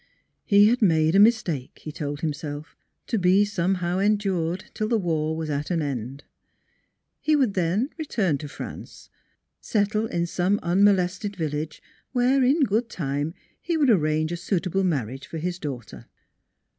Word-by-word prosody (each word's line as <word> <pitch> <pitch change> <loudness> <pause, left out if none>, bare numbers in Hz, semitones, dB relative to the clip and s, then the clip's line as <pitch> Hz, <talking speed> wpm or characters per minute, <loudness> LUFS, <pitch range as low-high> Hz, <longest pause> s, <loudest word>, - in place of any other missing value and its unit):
He 205 -1 +6
had 240 +3 +2
made 160 -5 +3
a 195 - +5
mistake, 200 - +2
he 155 - -5
told 145 0 -5
himself, 150 -1 -5 0.3
to 225 - -1
be 190 +3 +4
somehow 180 -2 -1
endured 195 -4 0
till 215 - -2
the 230 0 +2
war 160 -4 -1
was 160 -1 -3
at 145 +1 -2
an 170 -3 0
end. 135 0 -4 1.0
He 310 - +2
would 260 -8 +2
then 190 - 0
return 195 - 0
to 150 - -6
France, 145 - -9 0.5
settle 215 0 0
in 170 -5 -1
some 185 +4 0
unmolested 190 +2 +2
village, 155 -2 -4 0.3
where 255 +2 +3
in 280 +5 +3
good 225 +1 +1
time 145 -2 -3 0.3
he 340 -2 -1
would 285 -5 +4
arrange 155 -4 +1
a 175 - -2
suitable 190 +1 -1
marriage 135 - -2
for 165 - -6
his 175 +2 -3
daughter. 135 -8 -7
180 Hz, 155 wpm, -25 LUFS, 155-205 Hz, 1.0 s, He